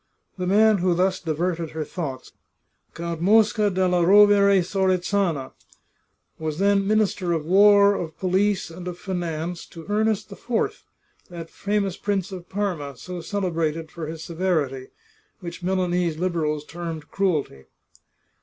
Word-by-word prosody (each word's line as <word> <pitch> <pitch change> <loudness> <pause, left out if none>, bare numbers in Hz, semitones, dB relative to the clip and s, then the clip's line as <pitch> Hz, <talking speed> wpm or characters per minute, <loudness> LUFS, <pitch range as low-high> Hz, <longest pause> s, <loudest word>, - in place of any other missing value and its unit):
The 180 - -2
man 210 +2 +4
who 180 0 +2
thus 185 +1 +1
diverted 165 0 -2
her 160 -1 -3
thoughts, 140 -8 -6 0.6
Count 170 -1 -4
Mosca 210 +2 +4
della 180 -2 +1
Rovere 200 0 +6
Sorezana, 185 -5 0 0.9
was 155 -1 -3
then 200 +1 +2
Minister 205 -4 +1
of 160 -2 -2
War, 200 +3 +6
of 165 -5 -5
Police, 190 0 0
and 180 +2 -8
of 175 -1 -5
Fi 190 +1 -6
nance 170 0 -3
to 165 -1 -11
Ernest 215 0 0
IV, 240 - -3 0.4
that 170 -2 -8
famous 200 -2 -1
Prince 200 -2 -2
of 180 -2 -9
Parma, 175 -9 -3
so 180 -1 -7
cele 190 +2 -2
brated 160 -1 -2
for 165 -3 -6
his 160 0 -7
severity, 160 -7 -1 0.5
which 175 -2 -8
Milanese 180 -3 0
Liberals 160 -4 -1
termed 165 -2 -7
cruel 185 -7 +1
ty. 65 -1 -17
180 Hz, 140 wpm, -24 LUFS, 165-200 Hz, 0.9 s, Rovere